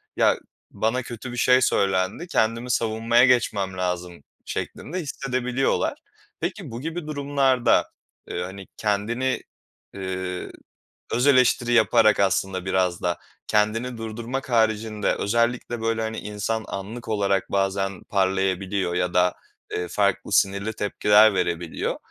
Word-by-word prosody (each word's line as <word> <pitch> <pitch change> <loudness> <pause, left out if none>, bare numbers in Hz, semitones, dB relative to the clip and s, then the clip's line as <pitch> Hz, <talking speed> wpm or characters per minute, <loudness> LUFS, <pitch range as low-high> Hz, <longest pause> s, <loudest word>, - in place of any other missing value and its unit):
"Ya, - - +3 0.3
bana 115 +4 0
kötü 120 +1 -7
bir 120 - -7
şey 125 +1 +5
söylendi, 100 - +1
kendimi 115 -4 0
savunmaya 115 +1 +3
geçmem 100 -7 +1
lazım." 90 -3 -3 0.2
şeklinde 180 +5 -4
hissedebiliyorlar. 135 - -1 0.4
Peki, 175 - -4
bu 115 +2 -6
gibi 165 +1 -5
durumlarda, 140 -4 +2 0.4
eee, 90 - -3
hani, 95 +1 -8
kendini, 115 +5 0 0.5
eee, 95 -1 -4 0.6
öz 125 +4 +2
eleştiri 125 -3 +4
yaparak 110 -2 +5
aslında 95 -1 +1
biraz 95 -2 0
da 90 -2 0 0.3
kendini 115 +4 +1
durdurmak 115 +4 -5
haricinde 110 -2 +1
özellikle, 115 +2 0
böyle, 115 0 0
hani, 110 0 -3
insan 105 +2 -3
anlık 105 +5 -6
olarak 100 -3 0
bazen 95 -1 -1
parlayabiliyor 95 -1 0
ya 90 0 0
da, 90 0 +3 0.4
eee, 90 0 -2
farklı 100 +3 0
sinirli 100 +2 +2
tepkiler 105 0 +4
verebiliyor. 85 -3 -2
110 Hz, 120 wpm, -24 LUFS, 95-120 Hz, 0.6 s, şey